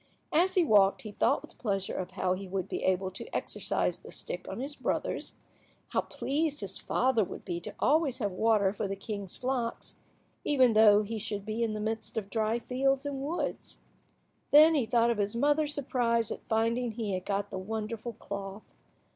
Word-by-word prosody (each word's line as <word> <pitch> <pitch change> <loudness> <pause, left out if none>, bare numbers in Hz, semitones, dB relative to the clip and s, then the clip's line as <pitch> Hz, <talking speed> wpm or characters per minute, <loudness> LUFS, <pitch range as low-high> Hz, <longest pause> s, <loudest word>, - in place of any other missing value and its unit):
As 365 +4 +3
he 360 -3 +4
walked 200 -6 +4
he 215 - -6
thought - - +1
with - - -15
pleasure 195 -4 -1
of 185 -1 -3
how 185 -1 +1
he 190 +1 -5
would 190 -1 -3
be - - -3
able 190 0 +1
to 455 - -8
exercise - - -1
the - - -12
stick - - -6
on - - -5
his 280 +3 -4
brothers, - - -2
and - - -34 0.5
how - - +1
pleased 295 0 -1
his 195 -2 -5
father 250 -3 +2
would - - -8
be 175 -2 -3
to 175 - -8
always 300 -3 +2
have 205 -6 -1
water 205 0 +2
for 210 0 -2
the 195 - -3
king's 200 -1 -5
flocks, 250 -2 -3 0.5
even 260 -5 +4
though 215 -1 +7
he 220 +1 -4
should 205 -1 -4
be 220 +2 -3
in 225 -2 0
the - - -3
midst 220 +1 -3
of 200 -2 -3
dry 220 0 +1
fields 270 +3 0
and 280 -2 -3
woods. 310 +5 -3 0.7
Then 310 +3 +8
he 270 -7 +1
thought 235 0 +3
of 225 - -2
his 205 +2 0
mother's 290 +3 +2
surprise 235 -5 0
at - - -5
finding 230 +1 +1
he 215 -3 -3
had 185 -1 -2
got 200 +1 -2
the 190 - -3
wonderful 220 +3 -4
cloth. 200 -1 -7
225 Hz, 195 wpm, -30 LUFS, 200-260 Hz, 0.7 s, Then